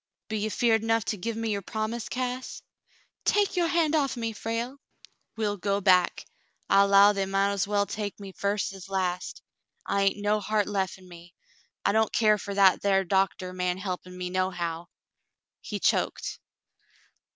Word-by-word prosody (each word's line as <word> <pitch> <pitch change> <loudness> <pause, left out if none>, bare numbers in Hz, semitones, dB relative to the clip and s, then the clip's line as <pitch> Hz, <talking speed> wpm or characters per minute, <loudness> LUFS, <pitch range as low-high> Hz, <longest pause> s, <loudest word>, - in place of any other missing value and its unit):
"Be 215 -1 -2
ye 215 +1 -1
'feared 225 +1 +2
'nough 225 -1 +1
to - - -1
give 230 +4 -3
me 225 -1 -2
your 200 -1 -1
promise, 220 +4 -4
Cass 255 0 -4 0.3
?*' - - -36
"Take 410 -1 +2
your 350 -2 +2
hand 330 -3 +2
off 275 -4 +1
me, 230 -1 -2
Frale." 230 +5 -4 0.6
"We'll 210 -2 -1
go 200 +1 0
back. 185 -3 +3 0.4
I 195 - +5
'low 200 +1 +6
they 195 -1 -1
mount 195 +1 +1
es 200 -1 -1
well 205 0 +1
take 205 0 -5
me 200 -1 -8
first 200 +1 -1
as 195 0 -11
last. 185 -2 -2 0.4
I 200 0 +1
hain't 195 - +2
no 205 +1 +1
heart 210 0 0
lef 195 -3 -2
in 185 -1 -17
me. 175 0 -14 0.5
I - - +4
don't 220 +1 +2
care 215 -2 +3
fer 200 0 -5
that 195 -2 +5
thar 195 -1 +3
doctah 190 -1 0
man 180 0 -1
he'pin' 185 -1 -5
me, 180 0 -4
nohow," 175 -2 -2 0.7
he - - -5
choked. - - 0
200 Hz, 175 wpm, -27 LUFS, 190-220 Hz, 0.7 s, low